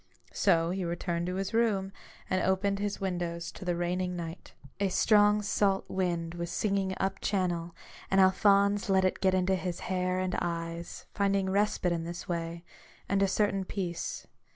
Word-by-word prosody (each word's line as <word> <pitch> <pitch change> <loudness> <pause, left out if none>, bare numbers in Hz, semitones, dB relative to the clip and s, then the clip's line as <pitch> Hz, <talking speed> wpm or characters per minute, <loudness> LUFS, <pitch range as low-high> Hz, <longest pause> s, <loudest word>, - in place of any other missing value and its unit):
So 165 0 +3
he 190 0 -2
returned 170 0 -2
to 180 - -2
his 195 +3 -3
room, 210 -4 +1 0.4
and 185 - +1
opened 195 +1 +1
his 205 0 -2
windows 175 -3 -3
to - - -10
the 175 -1 0
raining 180 +1 -1
night. 170 0 -7 0.2
A 200 -1 +1
strong 210 +2 +4
salt 200 -1 +1
wind 170 -3 -1
was 170 0 -4
singing 195 -2 0
up 195 0 -1
channel; 175 -4 -1 0.3
and 195 - +3
Alphonse 200 +1 +4
let 190 -1 +4
it 185 - 0
get 190 -1 +3
into 185 +1 +2
his 180 -2 -2
hair 185 0 -1
and 185 0 -1
eyes, 170 0 -4
finding 195 -1 +1
respite 200 -2 +1
in 170 -1 -1
this 170 +1 -6
way, 170 -1 -3 0.4
and 200 0 +1
a 195 - +4
certain 195 0 +1
peace. 185 -3 -4
185 Hz, 170 wpm, -30 LUFS, 175-195 Hz, 0.4 s, strong